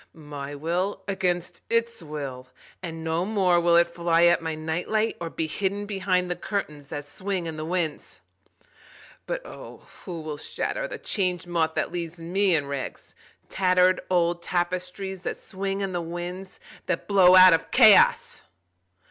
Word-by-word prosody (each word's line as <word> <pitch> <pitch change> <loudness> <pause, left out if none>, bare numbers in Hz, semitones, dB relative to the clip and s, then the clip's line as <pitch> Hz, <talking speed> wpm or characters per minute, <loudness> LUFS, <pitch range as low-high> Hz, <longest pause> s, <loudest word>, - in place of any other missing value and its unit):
My 145 -2 -7
will 180 +6 -2
against 180 -3 -2
its 230 -1 0
will, 140 -5 -6 0.3
and 165 -3 -6
no 160 +2 0
more 190 -4 +2
will 170 0 +3
it 170 0 +6
fly 170 -1 +2
at 170 0 +4
my 160 -1 -3
night 160 +2 -3
light 220 +1 0
or 170 - -3
be 160 - -2
hidden 200 +5 -2
behind 190 -3 0
the - - 0
curtains 150 -7 -4
that 145 -1 -6
swing 185 +4 -4
in 160 -1 -5
the 155 - -5
winds.(But 180 - -7
O - - -11 0.2
who 175 -4 -6
will 155 -1 -5
shatter - - -3
the - - -7
Change 180 -4 -1
Moth 165 -2 0
that - - -1
leaves 170 -1 -5
me 185 +2 +2
in 145 -3 0
rags—tattered 180 +6 -1
old 175 -1 +1
tapestries 180 +2 -3
that - - -4
swing 195 +1 -4
in 195 -1 -2
the 175 -1 -2
winds 175 +3 -6 0.3
that 180 - -2
blow 185 -3 +6
out 185 -1 +9
of 165 - 0
Chaos!) - - +5
175 Hz, 155 wpm, -25 LUFS, 160-190 Hz, 0.3 s, out